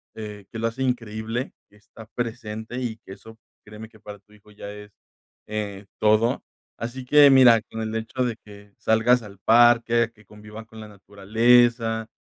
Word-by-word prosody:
eh, 105 -2 -9
que 115 - -7
lo 115 - 0
hace 120 +4 -4
increíble, 115 0 -3 0.2
que - - -25
está 105 +2 -15
presente 115 0 -5
y 115 -3 -4
que 95 - -13
eso 110 +3 -15 0.3
créeme 105 +1 -11
que 110 -1 -20
para 105 -1 -11
tu 100 +2 -32
hijo 105 0 -21
ya 100 -1 -9
es, 105 0 -12 0.6
eh, 105 -2 -5
todo. 110 +2 +2 0.3
Así 120 +3 -6
que 145 +2 +6
mira 125 -4 +6
con 110 - -5
el 110 0 -4
hecho 115 +3 -3
de 115 -2 -3
que 100 -1 -15
salgas 115 +3 +2
al 100 -2 -13
parque, 115 +1 +4
que 110 -1 -22
convivan 105 +2 -12
con 110 0 -14
la 110 - -10
naturaleza, 115 +3 +1
110 Hz, 175 wpm, -23 LUFS, 105-120 Hz, 0.6 s, que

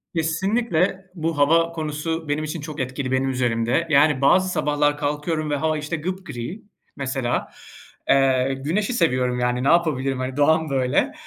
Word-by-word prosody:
Kesinlikle 190 +2 0
bu 165 -2 -2
hava 165 +3 +3
konusu 160 0 -4
benim 150 +1 0
için 155 0 -4
çok 150 0 -7
etkili 130 +1 -3
benim 130 +1 +1
üzerimde. 125 +4 0
Yani, 145 -1 +4
bazı 185 +6 +4
sabahlar 145 -3 +1
kalkıyorum 150 +1 -2
ve 145 - 0
hava 155 +1 0
işte 150 +3 -3
gıpgri 170 - -5 0.3
mesela. 130 -3 -2 0.6
Eee, 135 -1 +3
güneşi 200 +9 0
seviyorum, 125 - +1
yani, 125 +1 0
ne - - +1
yapabilirim, 140 -6 +2
hani, 130 +1 -4
doğam 160 +1 +3
böyle. 130 -2 +1
150 Hz, 150 wpm, -22 LUFS, 130-165 Hz, 0.6 s, Yani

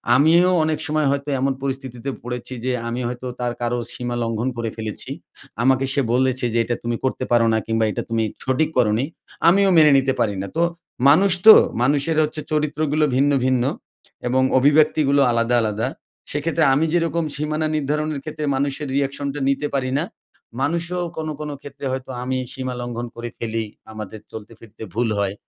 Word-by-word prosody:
আমিও 165 +6 +5
অনেক 155 -1 0
সময় 155 -1 +1
হয়তো 140 +1 -2
এমন 135 +1 +1
পরিস্থিতিতে 135 -2 -4
পড়েছি 125 +1 -4
যে 130 - +1 0.2
আমি 120 +2 -3
হয়তো 125 +1 -5
তার 120 -1 -1
কারো 120 0 0 0.2
সীমা 120 -1 -4
লঙ্ঘন 115 +2 -1
করে 115 -1 -2
ফেলেছি। 110 -2 -5 0.5
আমাকে 135 +1 +3
সে 140 - +2
বলেছে 130 0 +2
যে 115 - +2
এটা 120 +1 -2
তুমি 120 0 -1
করতে 130 -1 -1
পারো 120 -1 +4
না - - +3
কিংবা 115 0 +1
এটা - - -3
তুমি 115 -1 +1 0.2
সঠিক 130 +4 +1
করোনি। 115 +1 +2 0.4
আমিও 195 +2 +4
মেনে 155 -2 +7
নিতে 135 0 +2
পারি 105 -3 +1
না। 100 - -5
তো 170 - +3 0.5
মানুষ 190 +7 +5
তো! 220 - +13 0.3
মানুষের 145 +4 +1
হচ্ছে 155 0 -3
চরিত্রগুলো 150 0 +1
ভিন্ন, 140 +2 +3
ভিন্ন 130 -2 +2 0.6
এবং 130 +1 +2 0.2
অভিব্যক্তিগুলো 145 0 +4
আলাদা, 115 +1 +2
আলাদা। 110 +2 -1 0.4
সেইক্ষেত্রে 160 +3 0
আমি 155 +4 +2
যেইরকম 165 -1 +1
সীমানা 155 +1 -1
নির্ধারণের 150 0 -1
ক্ষেত্রে 155 -1 -5
মানুষের 140 +1 -2
রিয়েকশনটা 140 +1 -2
নিতে 140 +2 0
পারি 130 -2 0
না, 155 - 0 0.6
মানুষও 170 +4 -1 0.2
কোনো, 155 -1 -3
কোনো 150 -1 -4
ক্ষেত্রে 140 0 -9
হয়তো 130 0 -4
আমি 130 0 -1 0.2
সীমা 130 -1 -4
লঙ্ঘন 120 0 -4
করে 120 0 -5
ফেলি 115 -1 -2 0.3
আমাদের 110 0 -7
চলতে 110 -1 -9
ফিরতে 110 -1 -12
ভুল 120 +2 0
হয়। 100 -1 0
135 Hz, 170 wpm, -21 LUFS, 120-150 Hz, 0.6 s, তো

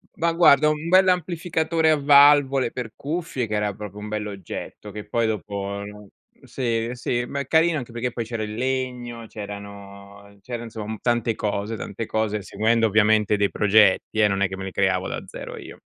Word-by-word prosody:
Ma 170 0 +1
guarda, 155 -3 +5
un 155 +1 -2
bell'amplificatore 170 -3 +2
a 155 - +3
valvole 140 -3 +5
per 120 -4 -6
cuffie, 150 -5 -3
che 105 - -5
era 105 -1 0
proprio 105 0 -9
un 105 - -7
bell'oggetto, 105 -1 -6
che 105 +1 -8
poi 115 +2 0
dopo 100 -1 -4 0.6
sì, 115 -2 -2
sì, 120 0 -2
ma 140 - -4
è 140 - -4
carino 160 0 +3
anche 125 -4 -6
perché 120 +1 -3
poi 115 - -3
c'era 115 -1 -4
il 105 0 -5
legno, 125 -1 -3
c'erano 100 -1 -10
c'era 120 +2 -6
insom 110 -1 -6
tante 120 -2 0
cose, 105 +1 -2
tante 110 +1 -5
cose 110 -1 -1
seguendo 115 +4 +1
ovviamente 105 0 +3
dei 100 -1 +2
progetti, 105 +1 +3
eh, 105 - +6
non 100 0 -1
è 100 - +3
che 95 - -6
me 95 - -7
li 95 - -5
creavo 95 -1 +1
da - - -4
zero - - -8
io. - - -11
110 Hz, 180 wpm, -23 LUFS, 105-130 Hz, 0.6 s, eh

